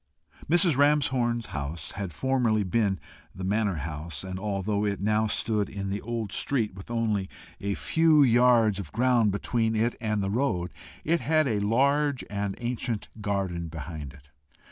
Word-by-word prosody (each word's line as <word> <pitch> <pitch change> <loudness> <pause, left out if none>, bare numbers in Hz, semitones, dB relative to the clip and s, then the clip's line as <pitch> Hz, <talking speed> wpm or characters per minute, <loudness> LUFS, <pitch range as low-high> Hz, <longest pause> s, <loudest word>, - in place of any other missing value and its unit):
Mrs. 175 -2 +5
Ramshorn's 130 -5 +2
house 75 +1 -4
had 95 -3 -5
formerly 120 0 +1
been 100 0 0 0.4
the 95 - -6
manor 105 0 +1
house, 80 +1 -5
and, 95 0 -5
although 100 0 -1
it 100 -1 -1
now 110 +2 +1
stood 105 -2 0
in 100 -1 -4
an 100 - -3
old 115 -2 -4
street, 115 -3 0
with 95 +2 -11
only 110 -5 0 0.3
a 100 0 -2
few 160 -2 +4
yards 120 -4 +4
of 90 -7 -7
ground 120 -3 +3
between 110 +2 0
it 115 +2 +1
and 105 -3 0
the 95 - -1
road, 100 -8 0 0.3
it 170 +2 +2
had 155 +3 +2
a 110 -4 0
large 140 +6 +2
and 100 -1 -2
ancient 120 -2 -3
garden 95 -5 -2
behind 80 -2 -7
it. 70 +1 -19
105 Hz, 160 wpm, -27 LUFS, 95-120 Hz, 0.4 s, Mrs